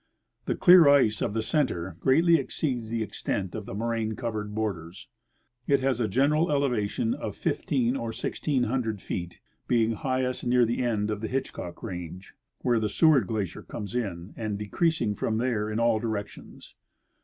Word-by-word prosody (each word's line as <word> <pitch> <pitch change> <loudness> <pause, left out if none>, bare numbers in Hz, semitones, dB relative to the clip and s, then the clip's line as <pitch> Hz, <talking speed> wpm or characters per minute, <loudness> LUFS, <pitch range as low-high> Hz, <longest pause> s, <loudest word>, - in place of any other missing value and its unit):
The - - 0
clear 175 -4 +7
ice 120 -7 +4
of 105 - -1
the 110 - 0
center 110 - -1
greatly 165 - +4
exceeds 130 -5 -3
the 115 -1 -1
extent 100 -2 -3
of 105 -2 -6
the - - -6
moraine 115 0 -1
cov 115 -1 -3
ered 105 -1 -4
borders. 95 -5 -4 0.6
It 140 -1 +3
has 130 -2 +1
a 110 - +1
general 150 - +2
elevation 120 -6 0
of - - -5
fifteen 125 -2 0
or 115 -4 -3
sixteen 135 +2 -1
hundred 115 -3 -1
feet, 90 -1 -6 0.3
being 115 -2 +2
highest 130 +2 -1
near 125 0 +4
the 115 +2 -1
end 110 -3 0
of 105 -1 -3
the 110 - -2
Hitchcock 130 -9 -4
range, 90 -3 -7 0.3
where 120 -2 +3
the 110 -1 -1
Seward 140 - +4
glacier 100 -5 -3
comes.in, 100 -5 -5
and 110 -3 -3
decreasing 115 - 0
from 110 +2 -1
there 115 -3 0
in 110 +1 -2
all. 115 -2 +3
directions. 110 -2 -6
115 Hz, 165 wpm, -27 LUFS, 105-130 Hz, 0.6 s, clear